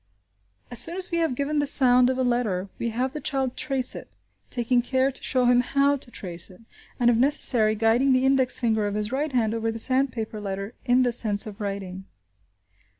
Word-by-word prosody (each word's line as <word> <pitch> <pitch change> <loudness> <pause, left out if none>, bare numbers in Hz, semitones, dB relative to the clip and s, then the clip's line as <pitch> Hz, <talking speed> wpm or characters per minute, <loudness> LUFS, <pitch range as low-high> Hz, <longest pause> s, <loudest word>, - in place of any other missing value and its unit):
As 240 - +2
soon 335 +2 +4
as 370 -1 -5
we 340 - 0
have 325 -6 0
given 285 +3 -1
the 290 - 0
sound 250 -2 +4
of 260 - -1
a 260 - 0
letter, 220 -7 -1
we 235 - -2
have 250 +3 -2
the 300 - -6
child 270 -4 -2
trace 265 -3 +1
it, - - -9 0.4
taking 240 0 0
care 260 +2 0
to - - -7
show 255 -1 +1
him 245 0 +4
how 280 +3 +1
to 265 - -10
trace 175 -6 -8
it, 185 +3 -17 0.4
and 240 -1 +4
if - - +1
necessary 240 -4 +3
guiding 230 +5 +2
the 255 0 +2
index 265 -2 +2
finger 220 -3 0
of 205 - -4
his 210 +1 -3
right 290 +3 -2
hand 225 -4 0
over 225 0 -2
the 225 - -6
sandpaper 245 -3 -1
letter 195 +2 -5
in 250 0 +3
the 245 - +1
sense 210 -3 0
of 215 0 -10
writing. 195 -2 -6
245 Hz, 210 wpm, -24 LUFS, 220-265 Hz, 0.4 s, soon